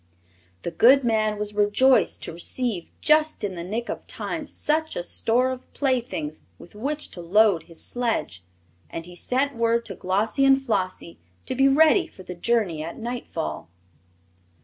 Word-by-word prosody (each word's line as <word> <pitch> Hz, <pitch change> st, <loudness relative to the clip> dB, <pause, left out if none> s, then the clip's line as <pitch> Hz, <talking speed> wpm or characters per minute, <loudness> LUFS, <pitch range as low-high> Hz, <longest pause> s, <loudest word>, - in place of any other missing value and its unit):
The -, -, -3 dB
good 260 Hz, +10 st, +6 dB
man 215 Hz, -2 st, +1 dB
was 210 Hz, 0 st, -3 dB
rejoiced 210 Hz, +6 st, +3 dB
to -, -, -4 dB
receive, 190 Hz, +2 st, -2 dB
just 305 Hz, -4 st, +3 dB
in 200 Hz, -2 st, -2 dB
the 170 Hz, -1 st, -6 dB
nick 225 Hz, +7 st, -4 dB
of -, -, -6 dB
time, -, -, -4 dB
such 315 Hz, +1 st, -1 dB
a 175 Hz, -, -3 dB
store 245 Hz, +7 st, +2 dB
of 255 Hz, 0 st, -8 dB
playthings 240 Hz, -, -2 dB, 0.2 s
with 170 Hz, -, -15 dB
which 285 Hz, +8 st, -4 dB
to 175 Hz, -, -8 dB
load 195 Hz, 0 st, +4 dB
his 165 Hz, -, -6 dB
sledge, 230 Hz, -, -2 dB, 0.5 s
and 165 Hz, -, -6 dB
he 175 Hz, -, -11 dB
sent 260 Hz, +9 st, -1 dB
word 230 Hz, 0 st, +1 dB
to 195 Hz, -, -4 dB
Glossie 205 Hz, +10 st, 0 dB
and 270 Hz, 0 st, +6 dB
Flossie 190 Hz, -9 st, -3 dB, 0.3 s
to -, -, -3 dB
be 270 Hz, +1 st, +4 dB
ready 320 Hz, +6 st, +5 dB
for 190 Hz, -, -14 dB
the 180 Hz, -, -7 dB
journey 180 Hz, -4 st, 0 dB
at 165 Hz, -, -7 dB
nightfall. 225 Hz, -, -5 dB
225 Hz, 165 wpm, -24 LUFS, 180-260 Hz, 0.5 s, good